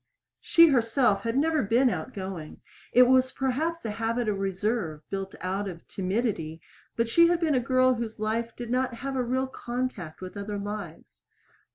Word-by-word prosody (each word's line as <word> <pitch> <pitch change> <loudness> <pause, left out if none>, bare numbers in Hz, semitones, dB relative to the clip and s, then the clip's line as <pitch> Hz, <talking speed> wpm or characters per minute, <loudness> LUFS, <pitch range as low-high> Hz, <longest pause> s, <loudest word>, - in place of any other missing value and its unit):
She 335 -1 +6
herself 235 -4 +2
had 230 +2 -1
never 310 +1 +2
been 235 +4 +3
outgoing. 190 -11 -6 0.3
It 250 - +7
was 260 +1 +4
perhaps 300 +6 -2
a 220 - -1
habit 230 +2 -1
of 205 -2 0
reserve 195 -4 -2
built 195 -1 -4
out 195 +2 -2
of 170 -2 -10
timidity, 185 -5 -2 0.4
but 230 0 +1
she 335 +9 +5
had 345 0 +2
been 320 -3 +1
a 255 - +3
girl 255 +1 +3
whose 225 -2 -5
life 225 +2 -2
did 240 -1 -6
not 255 -1 0
have 270 +3 -4
a 255 - +1
real 255 +2 0
contact 245 -10 -5
with 185 +1 -8
other 205 +1 -4
lives. 200 - -7
230 Hz, 175 wpm, -27 LUFS, 195-255 Hz, 0.4 s, It